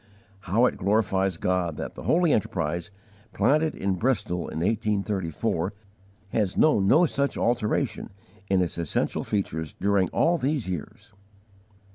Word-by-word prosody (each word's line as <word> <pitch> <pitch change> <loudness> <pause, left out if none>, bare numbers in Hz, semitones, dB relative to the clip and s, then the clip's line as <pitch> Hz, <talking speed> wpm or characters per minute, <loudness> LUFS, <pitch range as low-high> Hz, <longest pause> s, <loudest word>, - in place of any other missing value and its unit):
How 115 +6 +4
it - - 0
glorifies 95 -2 +1
God 90 -3 -1
that - - -5
the - - -9
holy 170 -2 +3
enterprise, 85 -1 -1 0.4
planted 155 +2 +2
in 95 -1 -1
Bristol 90 -6 -1
in - - -6
1834, 100 -3 -1 0.6
has 105 -4 0
known 105 -11 +4
no 170 - +6
such 140 -3 -1
alteration 115 -3 0 0.4
in 95 -1 +3
its 85 -1 -4
essential 85 -3 -1
features 80 -7 -3
during 100 -3 +2
all 170 +1 +2
these 135 -4 -1
years! 90 +1 -7
100 Hz, 130 wpm, -26 LUFS, 90-120 Hz, 0.6 s, no